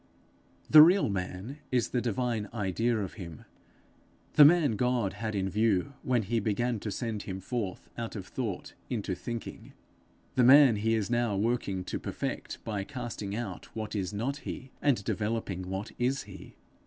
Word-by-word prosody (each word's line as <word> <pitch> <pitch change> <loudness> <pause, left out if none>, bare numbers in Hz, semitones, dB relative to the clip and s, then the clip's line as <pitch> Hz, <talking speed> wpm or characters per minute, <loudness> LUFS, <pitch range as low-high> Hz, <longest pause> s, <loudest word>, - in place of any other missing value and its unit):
The 155 - +10
real 175 - +6
man 95 +8 -4
is 125 -2 +1
the 125 - 0
divine 115 -2 -1
idea 115 +3 0
of 100 -4 -3
him; 85 -4 -9 0.9
the 150 - +9
man 155 -2 +6
God 125 -3 +1
had 110 -2 -4
in 95 -1 0
view 105 +4 +1
when 125 -3 +1
he 115 +4 0
began 115 +2 0
to 105 - -4
send 110 0 -3
him 95 0 -5
forth 100 -2 -4
out 115 -1 -4
of 95 -3 -5
thought 105 -1 -4 0.2
into 105 -5 -2
thinking; 115 +6 -7 0.6
the 125 - +3
man 130 -2 +8
he 115 +2 +1
is 110 +1 -1
now 120 -3 +1
working 100 -4 0
to - - -4
perfect - - -5
by 105 -3 -3
casting 120 -5 -5
out 110 -5 -5
what 110 -1 -4
is 95 -2 -2
not 120 +7 -2
he, 130 -2 -7
and 135 -8 +2
developing 105 -4 -2
what 95 +3 -4
is 130 +3 +1
he. 95 -1 -12
110 Hz, 165 wpm, -30 LUFS, 100-125 Hz, 0.9 s, The